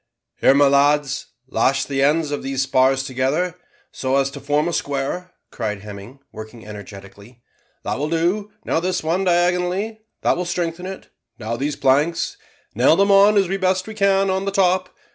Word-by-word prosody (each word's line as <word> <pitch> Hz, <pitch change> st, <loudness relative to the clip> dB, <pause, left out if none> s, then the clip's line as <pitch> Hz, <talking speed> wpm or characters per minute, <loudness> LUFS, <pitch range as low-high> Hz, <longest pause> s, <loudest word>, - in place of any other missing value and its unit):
"Here, 135 Hz, -, +4 dB
my 145 Hz, 0 st, +5 dB
lads, 140 Hz, 0 st, +2 dB, 0.2 s
lash 135 Hz, +1 st, +1 dB
the 135 Hz, -1 st, -2 dB
ends 150 Hz, +2 st, +2 dB
of 145 Hz, -, -2 dB
these 135 Hz, 0 st, -1 dB
spars 135 Hz, 0 st, +2 dB
together, 135 Hz, +7 st, -1 dB, 0.4 s
so 130 Hz, 0 st, -1 dB
as 135 Hz, 0 st, +1 dB
to -, -, -8 dB
form 145 Hz, +3 st, 0 dB
a 175 Hz, -, -2 dB
square," 145 Hz, +7 st, -3 dB, 0.2 s
cried 105 Hz, -2 st, -4 dB
Hemming, 105 Hz, +5 st, -10 dB
working 110 Hz, +1 st, -10 dB
energetically. 105 Hz, +3 st, -12 dB, 0.4 s
"That -, -, -3 dB
will 150 Hz, +2 st, -1 dB
do; 180 Hz, +6 st, 0 dB
now -, -, +1 dB
this 180 Hz, 0 st, -2 dB
one 170 Hz, +4 st, 0 dB
diagonally 180 Hz, +4 st, +1 dB, 0.2 s
that -, -, +3 dB
will 180 Hz, -, -3 dB
strengthen 175 Hz, 0 st, -3 dB
it; 190 Hz, 0 st, -9 dB, 0.3 s
now 115 Hz, 0 st, -4 dB
these 140 Hz, +4 st, -2 dB
planks; 145 Hz, +5 st, +1 dB, 0.4 s
nail 125 Hz, +7 st, +4 dB
them 200 Hz, +2 st, +3 dB
on 200 Hz, +2 st, +6 dB
as 195 Hz, -2 st, +3 dB
we 195 Hz, +2 st, -1 dB
best 185 Hz, -1 st, 0 dB
can 195 Hz, -1 st, +2 dB
on 190 Hz, +1 st, -1 dB
the 200 Hz, -, -1 dB
top. 185 Hz, -2 st, +2 dB
150 Hz, 175 wpm, -21 LUFS, 135-185 Hz, 0.4 s, on